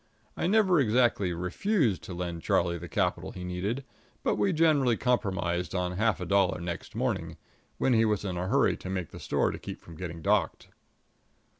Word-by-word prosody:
I - - -1
never 190 -4 +4
exactly 115 -6 +2
refused 105 - 0
to 90 - -6
lend 85 -1 -4
Charlie 85 +1 +1
the 85 +1 -8
capital 70 - -1
he 90 - -7
needed, 95 +9 -3 0.4
but - - +2
we 195 - +1
generally 150 -8 +3
compromised 95 -8 0
on 90 -1 0
half 110 +4 +1
a 90 - -4
dollar 100 0 +2
next 85 0 -6
morning, - - -2 0.4
when 130 - +2
he 115 -1 +4
was 105 -2 0
in 95 -2 -2
a 90 +1 -2
hurry 135 +7 +3
to 95 - -8
make 95 -4 -3
the - - -9
store - - +1
to - - -7
keep - - -7
from 85 - -13
getting 85 -1 -6
docked. 100 -4 +1
95 Hz, 185 wpm, -29 LUFS, 90-125 Hz, 0.4 s, never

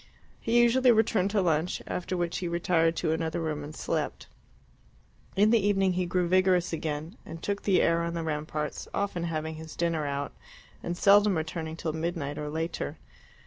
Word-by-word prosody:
He 235 +1 +2
usually 245 +2 +5
returned 215 -3 +2
to 200 -1 +1
lunch, 165 0 +1
after 180 +1 -3
which 175 -1 -1
he 180 - -3
retired 170 -1 +2
to 160 -1 0
another 160 +1 -1
room 155 -3 -2
and 150 +1 -8
slept. - - -3 1.1
In 210 +3 +4
the 230 -4 +4
evening 195 -2 +2
he 180 0 -1
grew 180 0 +1
vigorous 185 -1 +3
again, 155 +4 -4
and 165 - -9
took 200 0 -2
the 195 -3 +3
air 170 0 +3
on 170 0 -2
the 165 - -2
ramparts, 150 -1 -3
often 190 -4 -1
having 160 -1 -3
his 160 0 -9
dinner 165 -3 0
out, 140 0 -3 0.5
and 175 0 -4
seldom 205 -1 +5
returning 160 0 -4
till 165 -1 -3
midnight 160 -3 -3
or 150 0 -4
later. 160 -1 -3
170 Hz, 180 wpm, -28 LUFS, 160-185 Hz, 1.1 s, usually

